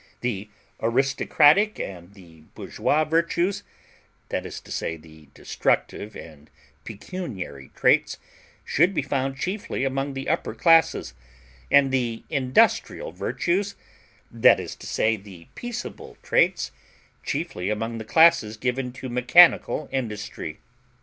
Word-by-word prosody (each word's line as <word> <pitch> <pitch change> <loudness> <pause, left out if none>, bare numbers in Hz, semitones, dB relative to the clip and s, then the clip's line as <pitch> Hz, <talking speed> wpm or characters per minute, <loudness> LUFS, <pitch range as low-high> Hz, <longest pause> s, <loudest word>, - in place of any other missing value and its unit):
The 105 -4 -3 0.3
aristocratic 145 - +3
and 90 +1 -7
the 85 -5 -17
bourgeois 155 +2 0
virtues 170 +4 0 0.7
that - - -3
is - - -7
to - - -15
say 80 - -3
the 80 -1 -17
destructive 105 - -1
and 75 -2 -12 0.3
pecuniary 100 - -7
traits - - +2 0.5
should 175 +6 +2
be 150 - 0
found 135 -1 -2
chiefly 185 -4 -3
among 135 +1 -2
the 135 - -5
upper 165 - -1
classes, 165 - +3 0.6
and 140 -1 +5
the 120 -4 -1
industrial 150 - +1
virtues 195 +3 -2 0.6
that - - +5
is - - -6
to - - -10
say 110 0 +1
the 95 -4 -13
peaceable 240 0 -7
traits - - +2 0.5
chiefly 140 - -3
among 115 +2 -3
the - - -5
classes 160 -6 +4
given 125 +2 -2
to 130 0 -7
mechanical 130 +5 +4
industry. 105 - -5
130 Hz, 120 wpm, -24 LUFS, 105-165 Hz, 0.7 s, and